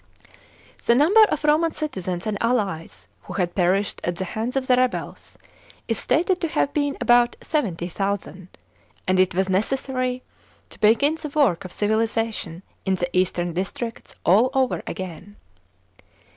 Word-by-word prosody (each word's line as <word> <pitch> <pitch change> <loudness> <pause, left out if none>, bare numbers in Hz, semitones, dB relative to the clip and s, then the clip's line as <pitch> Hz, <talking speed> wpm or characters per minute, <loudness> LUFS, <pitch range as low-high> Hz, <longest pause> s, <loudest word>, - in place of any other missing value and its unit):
The 235 - +6
number 335 - +6
of 305 -7 -3
Roman 310 +2 +3
citizens 185 - -4
and 215 -1 -1
allies, 190 - -1
who - - -9
had 175 -2 -1
perished 190 +2 +1
at 175 - -1
the 190 - -4
hands 225 +7 -4
of 270 -1 0
the 255 - +4
rebels, 255 0 -2 0.5
is 225 -3 -1
stated 350 +8 +1
to 335 - +1
have 285 -2 0
been 285 -1 0
about 240 0 +4
70,000, 190 - -3 0.6
and 185 0 +2
it. 185 -1 +3
was 190 +1 +1
necessary 255 +5 -1 0.5
to - - -15
begin 280 +9 +3
the 305 - -4
work 245 - +2
of 185 - -7
civilisation 220 -4 -1 0.2
in 190 -1 +1
the 175 0 -3
eastern 175 -2 +1
districts 200 +6 -5
all 210 +9 +5
over 260 -1 +1
again. 185 +2 -7
220 Hz, 145 wpm, -23 LUFS, 185-260 Hz, 0.6 s, The